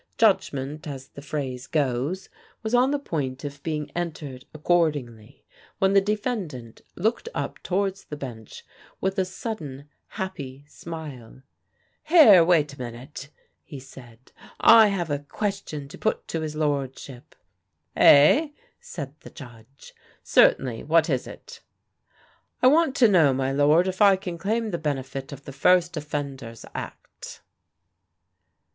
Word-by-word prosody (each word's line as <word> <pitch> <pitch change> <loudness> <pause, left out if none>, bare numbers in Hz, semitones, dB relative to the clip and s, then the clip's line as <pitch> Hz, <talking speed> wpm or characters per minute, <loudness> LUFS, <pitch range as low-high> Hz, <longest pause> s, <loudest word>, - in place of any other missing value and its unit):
Judgment, 150 -9 +1
as 135 -2 -8
the 140 - -11
phrase 140 -3 -5
goes, 145 +5 -1 0.4
was 220 +1 -3
on 250 +2 +4
the 290 - +1
point 140 - -4
of 145 0 -7
being 150 -2 -4
entered 150 -7 -5
accordingly, 150 -9 -1 0.3
when 195 0 +2
the 195 - +6
defendant 195 - -4
looked 225 - -1
up - - -4
towards 195 +1 -2
the 150 - -7
Bench 120 -6 -9 0.3
with 190 +1 -1
a 190 - +2
sudden, 155 - -7 0.2
happy 145 -8 -7
smile. 145 -7 -9 0.6
"Here, 300 - +8
wait 160 -4 +2
a 140 - -15
minute!" 125 +4 -8 0.3
he 140 - -10
said. 125 -2 -15 0.3
"I 225 -1 +8
have 175 -6 -2
a 145 - 0
question 160 -2 -5
to - - -12
put 220 - -1
to 165 - -2
his 155 -1 -5
lordship." 140 -2 -4 0.6
"Eh?" 150 - +6 0.3
said 140 -4 -8
the - - -12
Judge. 120 -2 -14 0.3
"Certainly. 120 -4 +3
What 160 +1 +3
is 130 -2 -1
it?" - - -12 1.0
"I - - +6
want 295 +1 +4
to 245 - +5
know, 160 -10 +4
my 135 0 -1
lord, 150 +6 +3
if 185 +2 -4
I 200 -2 +7
can 180 -3 -7
claim 220 +4 -1
the 170 - -3
benefit 135 -2 -4
of 140 0 -10
the 140 - -8
First 175 +5 +3
Offenders 140 -6 -6
Act?" - - -9
150 Hz, 140 wpm, -25 LUFS, 135-190 Hz, 1.0 s, Here